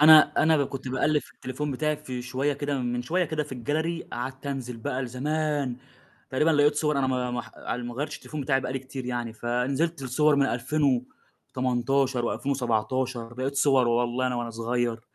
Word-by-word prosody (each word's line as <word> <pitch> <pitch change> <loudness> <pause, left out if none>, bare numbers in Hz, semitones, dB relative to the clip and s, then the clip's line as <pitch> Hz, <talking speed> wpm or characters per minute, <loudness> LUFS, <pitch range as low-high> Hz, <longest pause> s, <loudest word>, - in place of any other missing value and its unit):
أنا 155 0 +8
أنا 160 0 +5
ب 140 -2 +2
كنت 135 -1 -5
باقلّب 145 +4 +2
في - - -16
التليفون 135 +4 -4
بتاعي 150 +3 0
في 130 -4 -6
شوية 130 +3 0
كده 145 -1 -2
من 120 -1 -1
شوية 175 +8 +1
كده 155 -1 -1
في 145 -3 -7
الgallery، 160 +7 -2
قعدت 130 +3 -5
أنزل 130 -4 -3
بقى 125 +3 -2
لزمان، 145 +1 -1 0.5
تقريبًا 150 +5 +3
لقيت 145 -1 +4
صور 150 -1 +1
أنا 135 - +2
ما 125 -1 0
ما 120 0 -2
ح - - -13
على 125 - -3
ال 120 - -5
ما 120 - -6
غيرتش 145 +4 -3
التليفون 155 - -7
بتاعي 135 -1 +2
بقى 130 - -3
لي 135 - -1
كتير 130 -1 -7
يعني، 120 -2 -2
فنزلت 135 +7 -1
لصور 145 +3 +3
من 140 -1 +4
2018 130 -1 0
و2017 120 -2 -1
لقيت 135 +2 -1
صور 135 -3 +4
والله 120 +2 +1
أنا 125 - 0
وأنا 120 -1 -2
صغير، 115 0 -1
130 Hz, 190 wpm, -27 LUFS, 125-145 Hz, 0.5 s, أنا